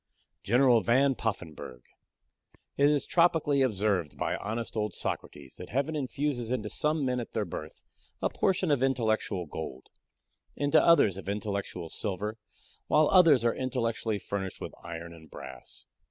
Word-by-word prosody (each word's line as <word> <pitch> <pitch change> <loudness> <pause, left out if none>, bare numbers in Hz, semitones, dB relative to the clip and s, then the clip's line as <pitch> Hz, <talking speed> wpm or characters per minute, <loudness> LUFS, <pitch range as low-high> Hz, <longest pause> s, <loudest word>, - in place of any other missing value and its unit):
GENERAL 120 +1 +4
VAN 135 +5 +3
POFFENBURGH 85 - -5 0.9
It 140 +1 +4
is 145 -2 +1
tropically 160 -5 +3
observed 100 - 0
by - - -1
honest 115 +2 -4
old 105 -2 -2
Socrates, 70 -2 -5
that 90 - -8
heaven 140 +5 -1
infuses 135 -3 -2
into 115 -4 -2
some 150 -1 0
men 125 -1 0
at 120 - -7
their 110 -2 0
birth 80 -3 -8 0.4
a - - +1
portion 185 -3 +1
of 140 -3 +2
intellectual 110 -8 0
gold, 65 -3 -7 0.7
into 145 +2 +3
others 110 - +5
of 100 - -6
intellectual 100 -5 -4
silver, 105 +2 -3 0.5
while 155 0 +4
others 160 - +6
are 115 - +3
intellectually 115 -4 -1
furnished 95 -2 -4
with - - -6
iron 85 0 -7
and 80 -1 -15
brass. 65 0 -10
115 Hz, 145 wpm, -29 LUFS, 95-140 Hz, 0.9 s, others